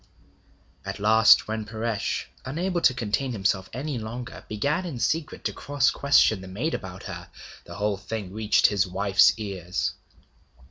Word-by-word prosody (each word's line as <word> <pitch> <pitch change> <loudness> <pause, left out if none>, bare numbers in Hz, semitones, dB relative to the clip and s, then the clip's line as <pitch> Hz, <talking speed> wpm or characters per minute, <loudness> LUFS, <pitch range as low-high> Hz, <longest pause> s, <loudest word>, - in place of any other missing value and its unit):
At 100 +2 -6
last 110 +2 +6
when 110 0 -3
Paresh, 110 0 -2 0.2
unable 175 +6 -2
to 130 - +5
contain 120 +2 -1
himself 95 -2 0
any 135 +1 -4
longer, 115 +2 -7
began 145 - 0
in 165 -8 -5
secret 155 +6 -1
to - - -1
cross 145 0 +1
question 140 -7 +3
the 95 - -9
maid 115 - -3
about 95 -1 -6
her, 90 -3 -8 0.4
the - - -10
whole 105 0 -1
thing 100 -1 -6
reached 110 0 +2
his 100 -1 +3
wife's 95 +2 +4
ears. 95 -4 -3
110 Hz, 150 wpm, -25 LUFS, 100-130 Hz, 0.4 s, last